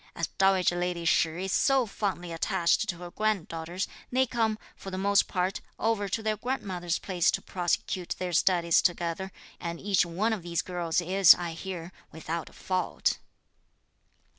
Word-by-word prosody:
As -, -, -1 dB
dowager 190 Hz, -2 st, +4 dB
lady 175 Hz, -1 st, -2 dB
Shih 165 Hz, +2 st, +2 dB
is 190 Hz, -, -3 dB
so 270 Hz, +4 st, +3 dB
fondly 195 Hz, -4 st, -3 dB
attached 170 Hz, +5 st, +1 dB
to 175 Hz, -, -2 dB
her 175 Hz, 0 st, -8 dB
granddaughters, 180 Hz, -4 st, -2 dB, 0.2 s
they 260 Hz, +1 st, +3 dB
come, 225 Hz, -3 st, 0 dB, 0.2 s
for 195 Hz, -, -8 dB
the 185 Hz, -, -5 dB
most 200 Hz, +1 st, +3 dB
part, 185 Hz, 0 st, -1 dB, 0.2 s
over 220 Hz, -3 st, 0 dB
to 220 Hz, +3 st, -2 dB
their 215 Hz, -1 st, 0 dB
grandmother's 185 Hz, -9 st, -2 dB
place 180 Hz, -3 st, +1 dB
to -, -, +1 dB
prosecute 180 Hz, 0 st, -2 dB
their 180 Hz, -1 st, -3 dB
studies 170 Hz, -1 st, +4 dB
together, 175 Hz, +1 st, -1 dB, 0.3 s
and 170 Hz, -1 st, -5 dB
each 200 Hz, -1 st, +2 dB
one 190 Hz, +7 st, 0 dB
of 210 Hz, -, -3 dB
these 170 Hz, 0 st, -2 dB
girls 175 Hz, -2 st, -1 dB
is, 185 Hz, +1 st, +7 dB
I 175 Hz, -1 st, -4 dB
hear, 175 Hz, 0 st, -6 dB, 0.2 s
without 160 Hz, +1 st, -5 dB
a -, -, -20 dB
fault." 185 Hz, -2 st, -1 dB
180 Hz, 165 wpm, -28 LUFS, 170-200 Hz, 0.3 s, is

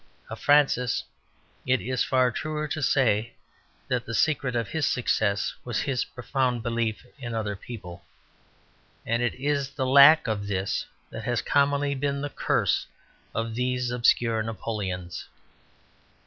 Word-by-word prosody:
Of -, -, -6 dB
Francis 140 Hz, -5 st, +3 dB, 0.6 s
it 130 Hz, 0 st, +2 dB
is 130 Hz, +1 st, -1 dB
far 130 Hz, -1 st, +2 dB
truer 155 Hz, +4 st, -3 dB
to 155 Hz, +1 st, -3 dB
say 115 Hz, -5 st, +2 dB, 0.5 s
that 125 Hz, -2 st, 0 dB
the 115 Hz, -, -5 dB
secret 140 Hz, -2 st, +1 dB
of 115 Hz, -2 st, 0 dB
his 160 Hz, -3 st, 0 dB
success 110 Hz, -6 st, +1 dB
was 120 Hz, -2 st, -2 dB
his 135 Hz, -4 st, -1 dB
profound 125 Hz, -2 st, -1 dB
belief 115 Hz, -1 st, -2 dB
in 120 Hz, -3 st, -5 dB
other 105 Hz, -2 st, -2 dB
people, 95 Hz, -5 st, -9 dB, 1.0 s
and 115 Hz, +1 st, 0 dB
it 120 Hz, -, 0 dB
is 140 Hz, 0 st, -1 dB
the 140 Hz, -1 st, -3 dB
lack 140 Hz, +4 st, +8 dB
of 105 Hz, -4 st, -2 dB
this 95 Hz, -1 st, -2 dB, 0.2 s
that 110 Hz, -1 st, -7 dB
has 120 Hz, -1 st, 0 dB
commonly 140 Hz, 0 st, +2 dB
been 140 Hz, +1 st, -1 dB
the 145 Hz, 0 st, -4 dB
curse -, -, 0 dB, 0.5 s
of 115 Hz, 0 st, -2 dB
these 125 Hz, 0 st, -1 dB
obscure 115 Hz, -2 st, +2 dB
Napoleons. 100 Hz, -5 st, -4 dB
125 Hz, 140 wpm, -26 LUFS, 115-140 Hz, 1.0 s, lack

